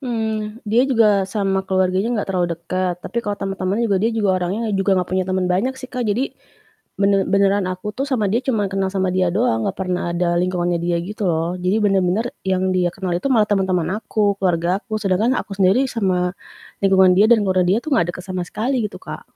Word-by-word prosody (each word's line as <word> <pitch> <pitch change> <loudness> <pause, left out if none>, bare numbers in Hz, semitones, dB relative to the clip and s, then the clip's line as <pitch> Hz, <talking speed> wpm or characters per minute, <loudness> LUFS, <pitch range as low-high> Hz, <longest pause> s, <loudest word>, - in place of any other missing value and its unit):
Mmm, 220 -4 -3
dia 230 +4 +3
juga 210 -6 +3
sama 195 -2 0
keluarganya 190 +2 +1
gak - - -8
terlalu 180 -1 +1
deket, 180 +1 -2
tapi 235 - -3
kalau 205 -2 -3
temen-temen 195 +3 -2
juga 200 -3 +1
dia 230 - +2
juga 220 -3 0
orangnya 210 +5 -2
juga 195 0 +2
gak 180 - -1
punya 185 0 +1
temen 185 -1 0
banyak 200 +9 0
sih 255 - -7
Kak, 250 -1 -4
jadi 240 +7 -1 0.7
bener 200 -1 +3
beneran 200 0 +2
aku 185 +3 -5
tuh 270 - -1
sama 240 -7 0
dia 235 +4 +1
cuman 220 -6 0
kenal 195 -1 0
sama 190 -1 0
dia 185 -1 +2
doang, 115 - +1
gak - - -16
pernah 180 -2 -2
ada 175 0 +1
lingkungannya 175 -1 0
dia 175 0 0
gitu 210 +1 -5
loh. 165 +2 -1
Jadi 185 +4 +1
bener-bener 195 +5 +1
yang 185 0 +1
dia 180 -1 +1
kenal 185 -3 -3
itu 230 - -2
malah 215 -3 +4
temen-temen 190 -4 +1
aku, 210 -2 0
keluargaku 185 +5 0
sedangkan 205 +7 +2
aku 200 - -6
sendiri 195 +8 +3
sama 185 -5 0 0.5
lingkungan 190 -1 +5
dia 210 +2 +6
dan 225 -3 +5
keluarga 185 -1 +2
dia 195 +4 +3
tuh 305 -3 0
gak 175 - +2
deket 180 - -9
sama 185 -1 -3
sekali 240 +2 -1
gitu - - -10
Kak. - - -8
195 Hz, 210 wpm, -20 LUFS, 185-215 Hz, 0.7 s, dia